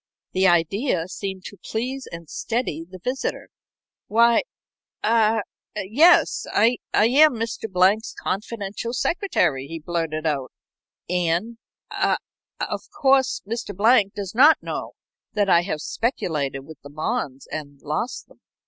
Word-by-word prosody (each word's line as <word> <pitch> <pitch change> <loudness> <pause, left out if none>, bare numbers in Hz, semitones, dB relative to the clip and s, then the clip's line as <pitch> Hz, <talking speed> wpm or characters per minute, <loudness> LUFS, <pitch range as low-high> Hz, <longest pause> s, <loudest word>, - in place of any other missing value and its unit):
The 190 0 +3
idea 175 - +1
seemed 190 0 -6
to 200 - -9
please 255 +4 -3
and 170 -1 -8
steady 225 - -2
the 185 - -9
visitor. 255 +9 -3 0.6
"Why 235 +2 +5 0.6
ah 225 0 +3 0.3
yes 255 - +4
I 230 +4 +3
am 265 +6 +5
Mr. 225 -1 -4
Blank's 190 +5 +2
confidential 210 +2 -4
secretary," 250 - 0
he 165 +2 -6
blurted 165 -1 -3
out. 140 -4 -1 0.6
"And 180 +6 0 0.3
ah - - +1 0.4
of - - -2
course 270 -3 +2
Mr. 215 -3 -4
Blank 215 -2 +4
does 200 -2 -5
not 290 +7 +7
know - - -5 0.4
that 205 -2 +1
I 170 - +6
have 175 -4 -3
speculated 150 - -2
with 155 +3 -13
the 145 - -11
bonds 155 - -3
and 145 -2 -6
lost 155 - -3
them." - - -23
200 Hz, 130 wpm, -23 LUFS, 165-235 Hz, 0.6 s, not